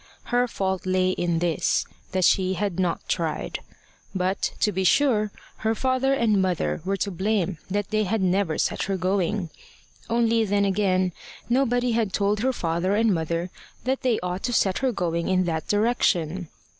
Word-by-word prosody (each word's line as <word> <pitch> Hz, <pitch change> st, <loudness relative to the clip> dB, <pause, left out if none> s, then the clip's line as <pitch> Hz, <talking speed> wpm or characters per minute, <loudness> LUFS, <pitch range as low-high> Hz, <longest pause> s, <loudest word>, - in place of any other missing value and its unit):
Her 245 Hz, 0 st, +3 dB
fault 190 Hz, -4 st, -2 dB
lay 185 Hz, 0 st, +2 dB
in 175 Hz, -2 st, 0 dB
this, 170 Hz, -1 st, +1 dB, 0.3 s
that 185 Hz, -1 st, +2 dB
she 190 Hz, 0 st, +3 dB
had 195 Hz, -2 st, -2 dB
not 180 Hz, -2 st, -1 dB
tried. 165 Hz, -3 st, -2 dB, 0.6 s
But, 185 Hz, +1 st, 0 dB
to 210 Hz, -, +3 dB
be 190 Hz, 0 st, -1 dB
sure, 215 Hz, 0 st, +3 dB, 0.3 s
her 220 Hz, 0 st, 0 dB
father 260 Hz, +2 st, +1 dB
and 225 Hz, -7 st, +3 dB
mother 180 Hz, -3 st, -1 dB
were 195 Hz, +2 st, -1 dB
to 200 Hz, -, -2 dB
blame 190 Hz, -2 st, -1 dB
that 205 Hz, +2 st, -2 dB
they 215 Hz, 0 st, +1 dB
had 220 Hz, +4 st, 0 dB
never 185 Hz, -3 st, +1 dB
set -, -, 0 dB
her 195 Hz, -1 st, -1 dB
going. 185 Hz, -1 st, 0 dB, 0.6 s
Only 230 Hz, -1 st, +2 dB
then 200 Hz, -1 st, +1 dB
again, 185 Hz, -2 st, +1 dB, 0.4 s
nobody 245 Hz, -1 st, +2 dB
had 225 Hz, -4 st, 0 dB
told 205 Hz, +1 st, +1 dB
her 260 Hz, +4 st, +1 dB
father 175 Hz, -2 st, -1 dB
and 220 Hz, -1 st, +3 dB
mother 170 Hz, +1 st, -2 dB, 0.3 s
that 260 Hz, +1 st, -1 dB
they 245 Hz, -4 st, +1 dB
ought 180 Hz, +1 st, -3 dB
to 245 Hz, -, -1 dB
set 190 Hz, -4 st, +2 dB
her 260 Hz, -1 st, +1 dB
going 170 Hz, -5 st, -1 dB
in 185 Hz, -1 st, +2 dB
that 160 Hz, -3 st, -2 dB
direction. 190 Hz, -6 st, +1 dB
195 Hz, 170 wpm, -25 LUFS, 180-220 Hz, 0.6 s, Her